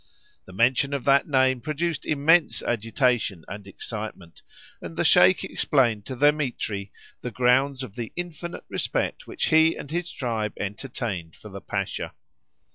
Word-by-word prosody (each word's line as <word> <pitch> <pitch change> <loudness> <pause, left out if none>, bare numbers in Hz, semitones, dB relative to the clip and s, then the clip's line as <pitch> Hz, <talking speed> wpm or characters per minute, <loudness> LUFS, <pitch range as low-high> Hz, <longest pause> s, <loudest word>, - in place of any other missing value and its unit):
The - - -13
mention 130 +7 +2
of 135 - -3
that 140 0 +4
name 130 -3 +3
produced 155 +2 -2
immense 155 +3 +3
agitation 115 - 0
and 100 +1 -8
excitement, 100 -4 -7 0.4
and 80 -1 -8
the - - +1
Sheik - - +6
explained 120 -7 +1
to 130 - -4
Dthemetri 125 -8 0 0.3
the 125 - -4
grounds 130 +3 +2
of 120 -7 -8
the 115 -1 -5
infinite 175 -1 -6
respect - - -2
which - - -1
he 160 +1 +5
and 145 - -8
his 175 +1 -2
tribe 110 -4 -2
entertained 100 -5 -4
for 105 - -12
the 100 0 -8
Pasha. 100 -2 -4
125 Hz, 145 wpm, -25 LUFS, 105-140 Hz, 0.4 s, Sheik